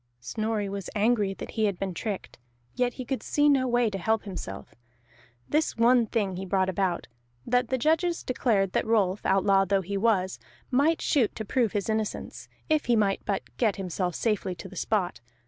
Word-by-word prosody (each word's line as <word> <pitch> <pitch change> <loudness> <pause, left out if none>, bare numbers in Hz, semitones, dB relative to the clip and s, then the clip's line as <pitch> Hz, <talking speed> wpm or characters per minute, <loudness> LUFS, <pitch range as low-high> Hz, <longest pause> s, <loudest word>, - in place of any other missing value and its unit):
Snorri 215 - -2
was 195 -1 -5
angry 210 -2 +2
that - - -7
he 220 -1 +1
had 200 -3 0
been 190 -1 -3
tricked, 200 - -5 0.3
yet 245 -1 0
he 255 - -6
could 265 +1 -2
see 295 0 +2
no 270 -3 +4
way 240 -1 +2
to 195 -2 -3
help 220 +4 +1
himself. 180 - -7 0.7
This 305 -3 0
one 235 0 +4
thing 200 -5 -1
he 190 - -4
brought 190 0 +1
about, 185 -2 -1 0.4
that 245 0 +2
the 260 - 0
judges 325 +6 +1
declared 210 -7 +1
that - - 0
Rolf, 205 -4 +2
outlaw 195 0 +4
though 195 0 +1
he 200 +3 -3
was, 195 -3 +1 0.3
might 295 +6 +2
shoot 255 -8 +2
to 220 - -5
prove 230 0 +1
his 205 -2 -1
innocence, 220 -1 -3 0.2
if 310 -1 +2
he 240 - +3
might 200 -3 +1
but 200 -2 -1
get 220 -5 +2
himself 180 -2 -2
safely 205 -5 -1
to 175 - -9
the 190 - -12
spot. 180 - -1
210 Hz, 190 wpm, -27 LUFS, 195-245 Hz, 0.7 s, no